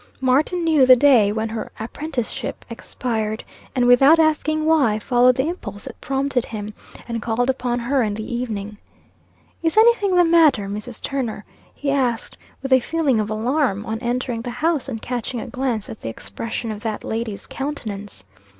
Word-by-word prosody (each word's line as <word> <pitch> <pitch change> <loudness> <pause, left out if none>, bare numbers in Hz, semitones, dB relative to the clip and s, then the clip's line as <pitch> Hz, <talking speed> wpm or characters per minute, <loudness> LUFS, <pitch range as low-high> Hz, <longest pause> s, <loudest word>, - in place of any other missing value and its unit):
Martin 285 +7 +2
knew 315 -4 +4
the 255 0 +8
day 245 -6 +5
when 220 +1 -1
her 225 0 -5
apprenticeship 245 +1 -4
expired, 220 -2 -3 0.3
and 250 -2 +2
without 270 +6 +7
asking 310 -1 +2
why, 285 -10 +3
followed 245 +3 +3
the 265 +4 0
impulse 205 - -6
that - - -10
prompted 270 -2 0
him, 215 -1 -6 0.3
and 230 -1 -3
called 240 +3 +1
upon 245 -2 -2
her 255 +3 0
in 210 -3 -1
the 220 +3 -5
evening. 215 -4 -4 0.8
"Is 325 +3 0
any 465 +2 +8
thing 400 -5 -1
the 355 - +6
matter, 320 - +4
Mrs. 210 +4 -7
Turner?" 240 -7 -3 0.3
he 280 -1 -2
asked, 250 -5 -1 0.3
with 270 -1 +1
a 260 - +7
feeling 285 -3 0
of 210 0 -1
alarm, 225 -1 0
on 220 0 -3
entering 240 0 -2
the 245 - -5
house 295 +3 0
and 225 -4 -4
catching 245 +1 -4
a - - -5
glance 250 -4 -2
at 220 - -9
the - - -4
expression 220 - -5
of 210 -1 -7
that 215 -2 -4
lady's 220 -2 -4
countenance. 210 - -6
245 Hz, 175 wpm, -21 LUFS, 220-280 Hz, 0.8 s, the